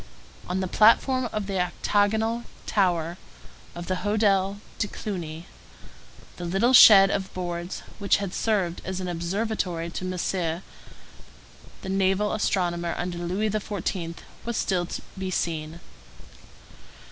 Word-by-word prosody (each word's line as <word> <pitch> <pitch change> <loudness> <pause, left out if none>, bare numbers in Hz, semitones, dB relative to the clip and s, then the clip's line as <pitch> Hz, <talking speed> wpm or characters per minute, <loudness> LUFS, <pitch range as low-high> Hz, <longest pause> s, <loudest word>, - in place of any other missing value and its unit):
On 185 +1 -1
the 185 - -1
platform 240 +5 +4
of 210 -2 -2
the 195 -1 -2
octagonal 215 +5 +1 0.2
tower 175 -4 +1 0.6
of 175 0 -6
the 185 +1 -1
Hotel 200 -1 +1 0.2
de 205 - +1
Cluny, 170 -6 -6 0.9
the 175 - -6
little 195 +9 +2
shed 195 -5 +9
of 190 -1 -2
boards, 175 -1 -4 0.2
which 200 -1 +3
had 200 -2 -4
served 195 -6 0
as 190 0 -4
an 185 - -4
observatory 175 -1 -2
to 185 - -5
Messier, 180 -1 -2 1.2
the 190 - -5
naval 195 +2 +1
astronomer 175 -5 0
under 175 -1 -3
Louis 190 +5 -1
XVI., 195 -5 -3 0.3
was 235 -1 -3
still 180 -3 0
to - - -6 0.2
be 190 -1 -3
seen. 160 -2 -2
190 Hz, 125 wpm, -26 LUFS, 175-205 Hz, 1.2 s, shed